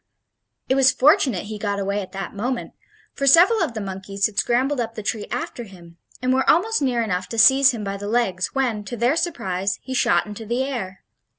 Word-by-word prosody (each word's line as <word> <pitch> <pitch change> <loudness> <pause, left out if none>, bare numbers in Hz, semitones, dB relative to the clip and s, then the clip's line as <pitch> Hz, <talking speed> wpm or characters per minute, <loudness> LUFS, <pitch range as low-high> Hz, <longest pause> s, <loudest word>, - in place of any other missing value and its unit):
It - - +2
was 265 -1 +5
fortunate 275 - +3
he 210 +1 -7
got 205 -1 -2
away 200 +1 -2
at 185 -1 -9
that 195 0 -6
moment, 240 +5 -3 0.4
for 275 - -2
several 360 - +6
of 300 -9 -2
the - - -3
monkeys 195 0 -3
had 210 -2 -1
scrambled 255 +3 +1
up 230 -1 -3
the 215 - -6
tree 210 0 -3
after 245 0 -5
him, 175 -5 -15 0.3
and 255 0 +2
were 265 0 +1
almost 445 +6 +2
near 245 -4 +1
enough 185 -4 -3
to 230 - -6
seize 265 +4 +6
him 230 -5 -3
by 200 0 -4
the 205 +1 -7
legs 200 -6 0
when, 240 -6 -1
to 240 - -6
their 240 +6 +2
surprise, 200 - -2
he 260 - -6
shot 175 -8 +2
into 210 +1 -8
the 240 +4 -1
air. 215 -9 -5
230 Hz, 215 wpm, -22 LUFS, 200-265 Hz, 0.4 s, several